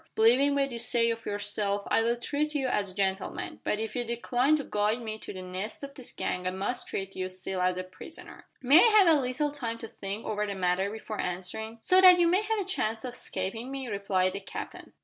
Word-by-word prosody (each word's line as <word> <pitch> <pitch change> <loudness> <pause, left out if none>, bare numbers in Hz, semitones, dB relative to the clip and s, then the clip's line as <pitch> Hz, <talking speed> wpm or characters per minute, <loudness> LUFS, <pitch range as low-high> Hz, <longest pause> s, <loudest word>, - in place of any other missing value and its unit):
Believing 255 +6 +5
what 275 -1 +1
you 235 - -4
say 235 0 +2
of 230 0 -6
yourself 205 0 -2
I - - +4
will 235 +1 +1
treat 295 +5 -2
you 270 -3 +1
as 205 -5 0
a 185 - -11
gentleman, 195 -1 -2
but 210 - 0
if 220 0 -4
you 245 - 0
decline 245 +4 +1
to 295 - -2
guide 210 0 0
me 220 -1 -5
to - - -8
the 185 -1 -7
nest 185 +7 -5
of 280 0 -7
this 260 -3 -7
gang 180 0 -3
I - - +2
must 200 +7 -3
treat 195 0 -4
you 185 0 -3
still 185 0 -4
as 180 0 +1
a 185 - -2
prisoner." 185 - -11 0.2
"May 280 +6 +7
I 470 - +7
have 395 -4 +7
a 305 -3 +5
little 265 +4 -1
time 235 -6 -4
to 225 - -8
think 200 +1 -6
over 210 0 -1
the 200 - -3
matter 185 +1 +1
before 215 0 -5
answering?" 185 +5 -4
"So 370 +9 +6
that 365 -1 +9
you 350 - +4
may 360 +4 +3
have 435 0 -1
a 395 - -2
chance 225 - -1
of 250 - -5
escaping 225 +3 -4
me?" 270 -2 -5
replied 195 -3 0
the 200 - -4
Captain. 195 - -8
225 Hz, 240 wpm, -29 LUFS, 195-265 Hz, 0.2 s, that